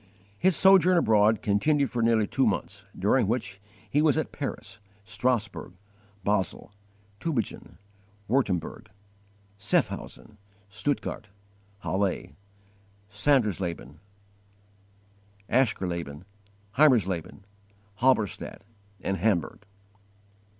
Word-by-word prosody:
His 190 -2 +3
sojourn 185 -2 +6
abroad 110 - +3
continued 140 +8 +2
for 120 -2 -1
nearly 115 -2 +3
two - - +1
months, - - -3
during - - +2
which 115 -2 -1
time 95 - -19 0.3
he 145 - +3
was 155 0 +3
at 155 - -2
Paris, 135 -5 -6 0.2
Strasburg, 115 -2 -2 0.5
Basle, 100 0 -1 0.5
Tubingen, 135 - -3 0.5
Wurtemberg, 100 - -1 0.7
Sehaffhausen, 105 +1 -2 0.3
Stuttgart, 110 +1 -3 0.5
Halle, 95 -2 -2 0.8
Sandersleben, 100 - 0 1.5
Aschersleben, 90 - -1 0.6
Heimersleben, 100 - +3 0.6
Halberstadt, 115 -7 0 0.4
and 95 - -2
Hamburg. 100 +1 -1
110 Hz, 80 wpm, -27 LUFS, 95-130 Hz, 1.5 s, sojourn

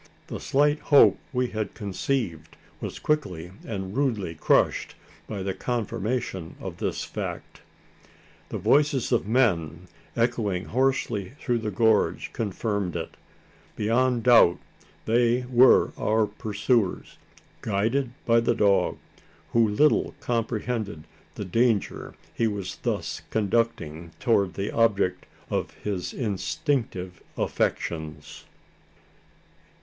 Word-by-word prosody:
The - - -6
slight 145 +2 +2
hope 145 - +6
we 125 -2 0
had 110 -2 -4
conceived 100 - -3 0.2
was - - -5
quickly 90 - -1
and 95 -2 -5
rudely 115 -11 0
crushed, 80 - +2 0.3
by 100 -3 -4
the 95 0 -2
confirmation 110 -5 -3
of - - -7
this - - -2
fact. - - -6 0.9
The - - -3
voices 145 -3 +2
of 120 -5 +1
men, 90 - +1 0.4
echoing 110 -6 0
hoarsely 120 -5 0
through 120 -3 0
the 110 -1 -3
gorge, 110 +1 +2
confirmed 100 -3 -2
it! - - -5 0.6
Beyond 120 +2 +1
doubt, 120 -8 +6 0.5
they 120 +2 +2
were 125 +1 +6
our 110 0 +2
pursuers, 105 0 -1 0.4
guided 115 +5 0
by 115 0 +5
the 115 0 +1
dog 100 -2 +2 0.5
who 115 -1 +4
little 150 +9 +2
comprehended 115 -6 -2 0.3
the 105 - -5
danger 115 +2 0 0.2
he 115 - +1
was 100 -3 -4
thus - - -3
conducting 100 -7 -1
towards 100 -7 +2
the 100 +1 -2
object 100 -5 +1 0.2
of - - -1
his 95 -4 -2
instinctive 105 - -2 0.2
affections! 80 -2 -3
110 Hz, 110 wpm, -26 LUFS, 95-120 Hz, 0.9 s, hope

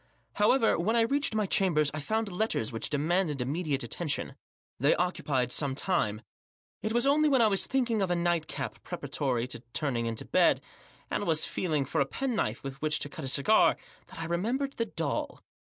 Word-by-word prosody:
However, 225 +1 +4
when 215 +7 +1
I 235 - +4
reached 275 +1 +1
my 215 -1 +2
chambers 175 -8 +2
I 155 - -3
found 220 +7 -1
letters 180 - -1
which 115 - -1
demanded 155 +1 0
immediate 140 +2 -1
attentioa 160 -1 -3 0.5
They 140 +5 +4
ooeupied 140 -8 0
some 135 0 0
time. 120 - 0 0.6
It 215 - -2
was 240 +2 +2
only 300 +2 +4
when 265 -4 +4
I - - +6
was 200 -3 +3
thinking 245 -5 +1
of 190 - 0
a 175 - +2
nightcap 170 -2 -2
preparatory 125 -4 -2
to 120 - -3
turning 125 -6 -1
into 115 -1 -3
bed, - - +4 0.5
and - - -1
was 160 -2 +2
feeling 155 -6 -1
for 150 +3 0
a 135 - +1
penknife 250 - -2
with 135 0 -7
which 155 0 +1
to 145 - -4
cut 160 -3 -7
a - - -3
cigar, 140 +11 +4 0.3
that - - -11
I 165 - -3
remembered 235 +12 -1
the 230 - 0
doll. 160 -7 -3
170 Hz, 190 wpm, -29 LUFS, 140-220 Hz, 0.6 s, I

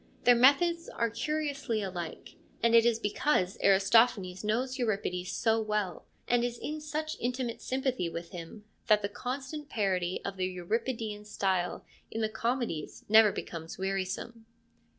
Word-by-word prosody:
Their 245 - +7
methods 335 +8 +4
are 230 -1 -1
curiously 280 -3 -2
alike, 175 -4 -6 0.3
and 230 0 +4
it 230 0 +7
is 235 -2 +3
because 210 -2 0
Aristophanes 195 -1 +4
knows 250 +5 -1
Euripides 195 -6 -1
so 225 -1 +2
well, 210 -4 -2 0.2
and 240 0 +3
is 240 0 -2
in 305 +4 -5
such 310 +1 -3
intimate 245 -1 -2
sympathy 260 -8 -1
with 170 0 -7
him, 175 +3 -8 0.2
that 210 -1 +4
the 200 - -1
constant 270 +7 -5
parody 185 -4 0
of 195 -1 -4
the 185 0 0
Euripidean 215 +4 -3
style 190 -4 -1 0.2
in 225 - -3
the 220 - +1
comedies 230 - -3
never 220 -1 +7
becomes 165 -3 -6
wearisome. 195 +4 -3
220 Hz, 145 wpm, -30 LUFS, 190-250 Hz, 0.3 s, Their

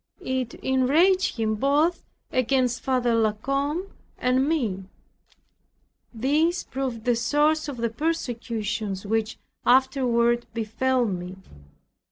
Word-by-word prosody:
It 260 -2 -2
enraged 315 +8 +2
him 220 -1 0
both 290 +9 +1 0.3
against 255 -1 +1
Father 250 -3 +1
La 220 -2 +2
Combe 280 - -2 0.3
and 255 +3 +1
me. 220 - -1 1.3
This 300 +9 +1
proved 260 -4 -4
the 245 -1 +3
source 295 +7 +1
of 280 -4 -5
the 235 0 -1
persecutions 225 - -3
which 220 +1 -1 0.3
afterward 245 -2 +3
befell 240 +3 0
me. 180 -3 -4
250 Hz, 105 wpm, -25 LUFS, 225-280 Hz, 1.3 s, the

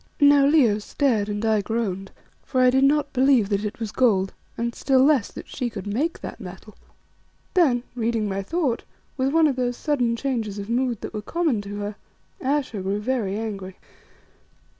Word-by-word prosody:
Now 285 -1 +6
Leo 255 -9 +4
stared 215 -2 0
and 205 +1 -2
I 220 -2 +3
groaned, 195 -3 -2 0.3
for 255 - -2
I 255 0 +6
did 265 +1 +3
not 290 0 +2
believe 260 -5 +4
that 200 0 0
it 210 +2 -4
was 220 -3 -4
gold, 195 -7 +2 0.2
and 235 0 -2
still 265 +1 +3
less 275 -7 +3
that - - -9
she 250 - -3
could 200 -4 -7
make 260 +12 -1
that - - -7
metal. - - -10 0.8
Then, 270 -10 +3
reading 230 -2 -1
my 195 0 -2
thought, 270 - -1 0.3
with 265 0 +1
one 325 +1 +4
of 275 -4 +1
those 245 -1 -1
sudden 245 -6 0
changes 230 -5 -2
of 200 +2 -5
mood 245 -2 0
that - - -6
were 215 - -3
common 305 -3 0
to 200 0 -7
her, 205 0 -5 0.4
Ayesha 265 -6 -1
grew 195 +2 -1
very 210 -4 -1
angry. 195 -4 -5
235 Hz, 180 wpm, -24 LUFS, 205-270 Hz, 0.8 s, Now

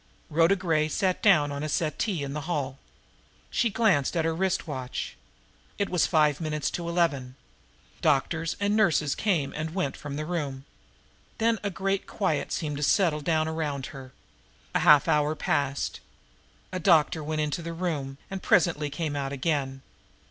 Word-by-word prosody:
Rhoda 165 +5 +4
Gray 165 -5 +1
sat 185 +2 0
down 160 -9 +5
on 140 0 -4
a 155 - -3
settee 160 +3 -1
in 140 0 -4
the 150 +2 -5
hall. 140 -5 -2 0.7
She 235 - +2
glanced 195 - +2
at 160 - +1
her 165 - +1
wrist 190 +2 0
watch. 130 -4 -5 0.6
It 200 - -1
was 180 -4 +2
five 150 -1 +3
minutes 150 -2 -1
of - - -3
eleven. 170 -7 0 0.7
Doctors 160 +4 +1
and 205 +1 +1
nurses 165 -9 +3
came 175 -10 0
and 155 +2 -4
went 145 -8 -1
from 145 -1 -7
the 155 +1 -3
room. 145 -6 -3 0.7
Then 225 -1 +2
a 205 - -1
great 195 +1 -2
quiet 175 -8 -1
seemed 150 -3 -2
to - - -5
settle 160 -2 +3
down 155 +1 +1
around 150 -4 -2
her. 135 -2 -10 0.6
A - - +2
half 150 -2 +6
hour 150 +1 +2
passed. 140 -2 -1 0.7
A 185 - -3
doctor 160 -2 +3
went 155 +1 -1
into 150 +3 -1
the 170 0 -5
room, 150 -6 -3
and 195 -1 -4
presently 155 -4 +2
came 150 0 -3
out 135 -1 -2
again. 135 -2 -2
155 Hz, 165 wpm, -27 LUFS, 145-175 Hz, 0.7 s, half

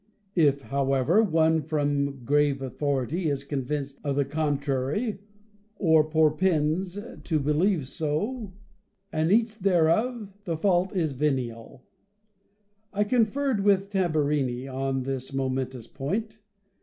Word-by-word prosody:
If, 145 -5 +3
however, 140 - +2
any 220 - 0
one 160 0 +3
from 145 -3 -1
grave 145 0 +2
authority 140 +4 -1
is 140 -1 -2
convinced 140 0 -3
of 140 -2 -1
the 140 0 +2
contrary, 145 - -1 0.6
or 160 -5 +4
propends 160 +3 +1 0.3
to 160 -3 0
believe 150 +2 +1
so, 185 - -2 0.6
and 160 +2 +1
eats 225 +1 +3
thereof, 200 +4 +1
the 165 -4 -2
fault 185 +2 +1
is 160 -6 0
veniaL 130 -3 -2 1.1
I 210 0 +1
conferred 240 +1 +1
with 200 0 +2
Tam 185 -5 +1
burini 140 -4 0
on 135 0 -2
this 135 0 -4
momentous 130 -2 -2
point. 210 - -4
150 Hz, 120 wpm, -26 LUFS, 135-190 Hz, 1.1 s, or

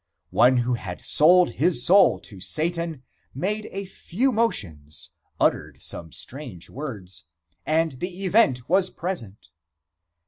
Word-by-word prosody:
One 125 +1 +5
who 125 +1 +1
had 95 -7 -5
sold 175 +3 +5
his 160 -5 +2
soul 195 +2 +5
to 100 -4 -12
Satan 160 - -2 0.3
made 210 +9 -2
a 195 +1 -5
few 210 +7 -1
motions, 85 - -2 0.3
uttered - - 0
some 80 -2 -6
strange 125 - -8
words, 110 -10 -7 0.4
and 160 +1 +2
the 185 +2 -5
event 155 - +3
was 185 +1 +3
present. 160 - -6
155 Hz, 125 wpm, -24 LUFS, 115-185 Hz, 0.4 s, One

